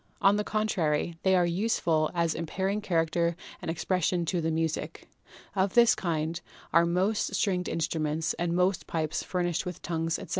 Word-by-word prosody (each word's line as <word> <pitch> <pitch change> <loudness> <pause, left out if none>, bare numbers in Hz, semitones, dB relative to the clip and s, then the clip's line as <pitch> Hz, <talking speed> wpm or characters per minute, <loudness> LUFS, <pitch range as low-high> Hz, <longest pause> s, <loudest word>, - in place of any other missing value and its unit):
On 195 +1 +5
the 210 - 0
contrary, 170 -7 0
they 190 0 +3
are 180 -1 +4
useful 170 -4 +1
as 170 -2 +1
imparting 190 +5 -2
character 170 -2 +1 0.3
and - - -5
expression 175 +1 0
to 175 +1 0
the 165 - 0
music. 160 0 -2 0.5
Of 190 0 +1
this 235 -1 +7
kind 165 -4 -2 0.3
are 170 +1 +5
most 190 +5 0
stringed 180 -3 0
instruments 160 -1 -1
and 170 0 0
most 180 0 +1
pipes 155 -1 -1
furnished 175 -2 -1
with 180 - -7
tongues, 165 -1 -1
etc. - - -9
170 Hz, 160 wpm, -28 LUFS, 165-190 Hz, 0.5 s, this